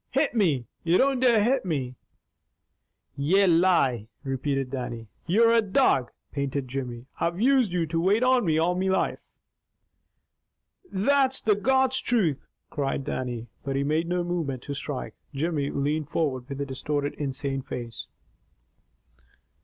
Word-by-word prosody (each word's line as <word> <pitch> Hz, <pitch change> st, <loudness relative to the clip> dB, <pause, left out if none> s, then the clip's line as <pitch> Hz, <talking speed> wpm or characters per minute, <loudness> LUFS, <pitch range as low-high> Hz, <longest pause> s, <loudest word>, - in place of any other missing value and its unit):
Hit 280 Hz, 0 st, +1 dB
me! 160 Hz, -, +2 dB, 0.2 s
You 170 Hz, +2 st, +3 dB
don't 270 Hz, -1 st, +3 dB
dare 235 Hz, -4 st, +4 dB
hit 255 Hz, +3 st, +2 dB
me!" 140 Hz, -8 st, -2 dB, 1.2 s
"Ye 175 Hz, +8 st, +3 dB
lie!" 165 Hz, -, +3 dB, 0.2 s
repeated 135 Hz, -1 st, -2 dB
Dannie. 120 Hz, -4 st, -5 dB, 0.2 s
"You're 230 Hz, +6 st, +4 dB
a 230 Hz, -, +5 dB
dog!" 190 Hz, -, +2 dB, 0.2 s
panted 140 Hz, -1 st, -2 dB
Jimmy. 125 Hz, -2 st, -5 dB
"I've 170 Hz, +2 st, -1 dB
used 255 Hz, -3 st, +3 dB
you 175 Hz, -2 st, 0 dB
to 165 Hz, +1 st, -2 dB
wait 205 Hz, +7 st, +3 dB
on 255 Hz, -1 st, +4 dB
me 160 Hz, -4 st, +2 dB
all 170 Hz, +3 st, +2 dB
me 185 Hz, +1 st, 0 dB
life!" 190 Hz, -, -1 dB, 1.6 s
"THAT'S 265 Hz, +6 st, +2 dB
the 215 Hz, -, +3 dB
God's 265 Hz, +5 st, +2 dB
truth!" 185 Hz, -, 0 dB, 0.2 s
cried 140 Hz, -1 st, -2 dB
Dannie. 125 Hz, -3 st, -4 dB, 0.2 s
But 135 Hz, 0 st, -3 dB
he 140 Hz, -, +1 dB
made 155 Hz, +4 st, 0 dB
no 180 Hz, 0 st, 0 dB
movement 165 Hz, -8 st, -3 dB
to 145 Hz, -, -5 dB
strike. 140 Hz, -1 st, -5 dB, 0.2 s
Jimmy 145 Hz, -1 st, -1 dB
leaned 150 Hz, +2 st, -1 dB
forward 135 Hz, -6 st, -1 dB
with 140 Hz, 0 st, -5 dB
a 140 Hz, -, -1 dB
distorted, 145 Hz, +2 st, -2 dB
insane 135 Hz, -1 st, -3 dB
face. 120 Hz, -3 st, -7 dB
155 Hz, 145 wpm, -26 LUFS, 135-200 Hz, 1.6 s, a